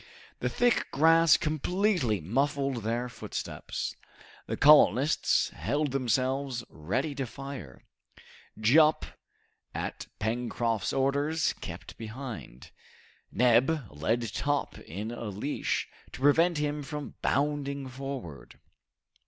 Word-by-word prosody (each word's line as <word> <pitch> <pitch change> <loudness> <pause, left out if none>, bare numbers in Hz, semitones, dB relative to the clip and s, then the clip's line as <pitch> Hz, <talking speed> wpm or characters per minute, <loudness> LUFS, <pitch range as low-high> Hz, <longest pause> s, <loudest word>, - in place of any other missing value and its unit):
The - - 0
thick 245 -1 +2
grass 165 +2 +5
completely 155 - 0
muffled 135 - 0
their 115 +2 -2
footsteps. 120 - -5 0.5
The - - -3
colonists 145 -2 +5
held 145 -1 -1
themselves 130 0 0
ready 120 - -2
to 135 -2 -3
fire. 130 - -8 0.8
Jup, 150 +8 +5 0.7
at - - -4
Pencroft's 115 0 -1
orders, 140 +4 +1
kept - - -9
behind. 110 - -8 0.6
Neb 125 +5 +3
led 110 +10 -1
Top 145 0 -1
in 105 +7 -6
a 120 -1 -6
leash, 105 +9 -2 0.3
to - - -8
prevent 165 +4 +4
him 150 0 -1
from 150 +1 -6
bounding 140 -1 0
forward. 130 - -7
135 Hz, 100 wpm, -29 LUFS, 115-145 Hz, 0.8 s, grass